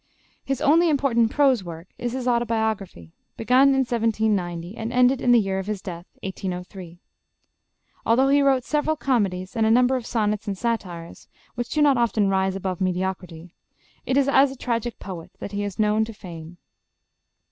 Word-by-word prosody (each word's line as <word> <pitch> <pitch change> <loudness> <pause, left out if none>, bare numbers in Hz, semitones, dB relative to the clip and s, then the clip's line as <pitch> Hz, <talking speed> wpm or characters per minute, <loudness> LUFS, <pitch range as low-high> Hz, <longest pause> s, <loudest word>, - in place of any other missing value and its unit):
His 270 0 -3
only 325 +3 +4
important 260 -6 +2
prose 265 -5 +2
work 170 0 -9
is 240 -1 -3
his 255 -1 -3
'Auto 240 -1 +2
biography' 220 - -3 0.3
begun 250 +4 +4
in 270 -1 +3
1790 210 -6 -1
and 225 0 -5
ended 250 +1 +3
in 245 - +3
the 240 - +6
year 195 -2 -1
of 190 - -6
his 210 -2 -3
death, 175 -1 -8 0.2
1803. 180 -2 -6 1.1
Although 260 +4 +3
he 285 +1 +4
wrote 270 -2 +3
several 305 +3 0
comedies 195 -10 -1
and 225 - +1
a 220 - +3
number 250 +3 +4
of 245 -3 -4
sonnets 210 -3 -1
and 200 -2 -3
satires, 185 -7 -4 0.3
which 240 0 -4
do 300 - +1
not 280 -3 +4
often 215 -4 +1
rise 190 0 +1
above 190 -1 -4
mediocrity, 180 -2 -3 0.5
it 265 - 0
is 280 -1 +3
as 275 0 +4
a - - -8
tragic 235 -1 -3
poet 180 -4 -8
that - - -7
he 205 0 -3
is 200 -3 -5
known 215 0 +2
to 225 - -9
fame. 175 -4 -10
220 Hz, 180 wpm, -23 LUFS, 190-250 Hz, 1.1 s, the